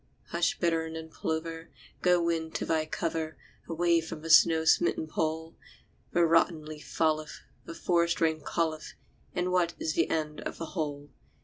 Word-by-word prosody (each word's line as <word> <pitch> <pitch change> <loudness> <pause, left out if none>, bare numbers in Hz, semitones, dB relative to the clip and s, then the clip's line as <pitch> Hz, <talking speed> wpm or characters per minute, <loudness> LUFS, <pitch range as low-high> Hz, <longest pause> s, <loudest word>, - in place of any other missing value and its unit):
Hush, - - +1
bittern 165 -2 0
and 160 0 -7
plover! 165 +1 -4 0.3
Go, 180 -1 +4
wind, 165 -1 -1
to - - -1
thy 160 -1 0
cover 160 -1 -3 0.3
Away 170 0 +2
by 160 - -6
the 160 +1 -3
snow 160 -1 +6
smitten 160 0 +3
Pole! 160 +1 -2 0.6
The 170 0 +4
rotten 165 -1 +3
leaf 155 -1 -9
falleth, 155 -1 0 0.2
the 165 - -8
forest 170 0 +1
rain 160 -1 +1
calleth; 160 -1 -2 0.4
And 180 +1 0
what 175 -2 +2
is 155 - -2
the 165 - +1
end 155 -1 -2
of - - -5
the 165 -1 -6
whole? 145 -4 -4
160 Hz, 165 wpm, -29 LUFS, 155-170 Hz, 0.6 s, snow